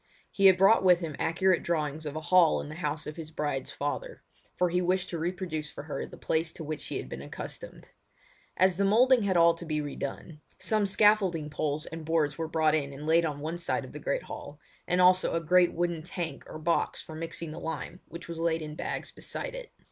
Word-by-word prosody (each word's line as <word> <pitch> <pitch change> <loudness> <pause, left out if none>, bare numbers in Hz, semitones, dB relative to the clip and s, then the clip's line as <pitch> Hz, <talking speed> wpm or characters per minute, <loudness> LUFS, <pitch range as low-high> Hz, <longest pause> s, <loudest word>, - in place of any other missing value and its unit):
He 195 -1 +5
had 190 -1 +7
brought 195 +3 +5
with 180 -2 +6
him 160 -4 -4
accurate 185 +2 +2
drawings 155 -2 -2
of 145 - -5
a 155 - -3
hall 175 -1 +5
in - - -6
the - - -6
house 150 -2 -3
of 150 - -7
his 160 -2 -7
bride's 145 -4 -3
father, 485 - -4 0.3
for 180 -1 +2
he 180 +1 +2
wished 180 +1 0
to 170 - -3
reproduce 170 -3 -3
for - - -8
her 150 - -4
the - - -12
place 160 0 0
to 165 - -7
which 155 0 -4
she - - -4
had - - -5
been - - -7
accustomed. - - -8 0.7
As 185 -1 +4
the 200 - +2
moulding 240 +5 +5
had 195 -3 +1
all 170 0 +6
to 165 - -9
be 155 -2 -2
re 145 -1 -4
done, 150 +3 -6 0.2
some 215 -2 +1
scaffolding 190 -7 +3
poles 150 +1 -2
and 165 0 -7
boards 155 -2 +1
were 165 -1 -3
brought 155 -1 +2
in 140 -3 0
and 145 +2 -8
laid 165 +2 +4
on 145 -2 -3
one 160 +3 -3
side 170 - -1
of - - -11
the - - -8
great - - -1
hall, - - -9 0.3
and 180 - +1
also 185 -1 +4
a - - +2
great 175 +2 +4
wooden 170 -1 -1
tank 175 0 -5
or - - -8
box 165 +2 0
for 160 - -10
mixing 165 0 -5
the - - -7
lime, 165 +2 -5
which 170 0 -9
was 170 -1 -6
laid 165 -1 0
in 150 0 -6
bags - - -4
beside - - -6
it. - - -8
165 Hz, 230 wpm, -29 LUFS, 155-180 Hz, 0.7 s, had